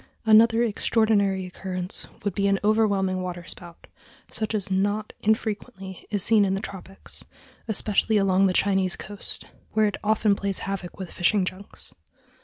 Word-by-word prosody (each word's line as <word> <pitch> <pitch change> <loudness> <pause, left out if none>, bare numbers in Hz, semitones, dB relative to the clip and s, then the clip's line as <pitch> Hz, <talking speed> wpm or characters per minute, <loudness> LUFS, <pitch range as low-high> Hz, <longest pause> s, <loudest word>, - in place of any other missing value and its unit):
Another 225 +1 +6
extraordinary 205 -3 +1
occurrence 180 0 -5 0.2
would 205 -2 -1
be 200 +1 +1
an 195 0 +2
overwhelming 200 -3 +2
waterspout, 175 -1 -7 0.5
such 215 0 -2
as 200 -2 -3
not 205 +3 0
infrequently 210 -3 -2
is 205 -3 0
seen 215 -1 +5
in 190 -1 +1
the - - -2
tropics, 195 -1 -6 0.4
especially 215 0 +2
along 195 -1 +3
the - - +2
Chinese 190 -1 +2
coast, 205 0 -7 0.3
where 215 0 +3
it 205 - -1
often 210 -1 +3
plays 200 -1 -1
havoc 195 -3 -5
with 190 -3 -7
fishing 190 +2 +2
junks. 185 +2 -8
200 Hz, 145 wpm, -25 LUFS, 190-215 Hz, 0.5 s, Another